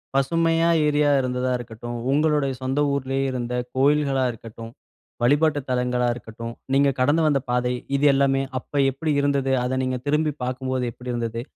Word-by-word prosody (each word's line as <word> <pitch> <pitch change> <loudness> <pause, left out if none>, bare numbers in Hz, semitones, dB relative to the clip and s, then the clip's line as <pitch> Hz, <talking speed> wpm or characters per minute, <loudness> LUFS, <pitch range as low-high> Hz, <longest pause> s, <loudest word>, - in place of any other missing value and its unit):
பசுமையா 165 +4 +2 0.2
ஏரியா 145 0 +2
இருந்ததா 125 0 -1
இருக்கட்டும். 120 0 -7 0.2
உங்களுடைய 150 -1 +2
சொந்த 130 +2 -2
ஊர்லயே 135 -1 -1
இருந்த 125 -1 -3 0.2
கோவில்களா 140 0 +2
இருக்கட்டும், 115 0 -10 0.5
வழிபாட்டு 145 +4 +3
தலங்களா 125 -1 0
இருக்கட்டும். 115 0 -8 0.2
நீங்க 140 +1 +4
கடந்து 145 +6 +3
வந்த 145 -2 +2
பாதை, 125 0 +1 0.2
இது 140 - +1
எல்லாமே 135 0 +2 0.2
அப்போ 145 - -7
எப்படி 150 +4 -2
இருந்தது? 140 -1 +1
அதை 130 +1 -1
நீங்க 130 0 -1
திரும்பி 150 +1 +1
பார்க்கும்போது 130 0 -2
எப்படி 125 +2 -7
இருந்தது? 115 -1 -3
130 Hz, 145 wpm, -23 LUFS, 125-145 Hz, 0.5 s, நீங்க